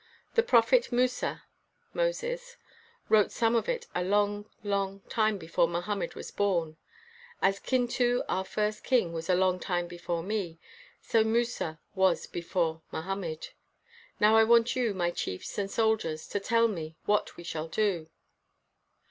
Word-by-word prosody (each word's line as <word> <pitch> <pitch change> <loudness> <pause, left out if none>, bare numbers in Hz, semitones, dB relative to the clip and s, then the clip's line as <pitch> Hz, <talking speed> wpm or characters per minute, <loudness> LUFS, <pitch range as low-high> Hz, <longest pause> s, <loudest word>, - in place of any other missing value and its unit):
The 465 - +5
prophet 485 - +4
Musa 250 +1 0 0.5
[Moses] - - -2 0.5
wrote 210 -2 +4
some 230 -1 +1
of 230 - +1
it 485 -1 -1
a 180 - 0
long, 205 +2 +1
long 195 -1 -1
time 215 0 +1
before 170 -1 +1
Mohammed 175 +2 -3
was - - -7
born. 170 -6 0 0.6
As 195 +1 +2
Kin 255 -2 +1
tu, 245 0 +1
our 190 - 0
first 210 +2 -2
king, 235 -10 +2
was 165 +1 -5
a 180 - +5
long 185 0 +2
time 175 -1 -1
before 175 -1 -4
me, 190 -4 -3 0.5
so 225 -1 +3
Musa 220 -8 -1
was 190 -3 +2
before 165 -2 -2
Mohammed. 170 -2 -4 0.7
Now 215 +1 +5
I 225 - +7
want 235 +1 +4
you, 235 -5 0
my 175 -2 0
chiefs 90 - -5
and 200 -1 -1
soldiers, 215 -9 0
to 205 - -1
tell 230 +3 +3
me 160 -6 -5
what 210 0 +1
we 175 - -9
shall 160 -2 -4
do. 175 -3 0
200 Hz, 150 wpm, -29 LUFS, 175-230 Hz, 0.7 s, I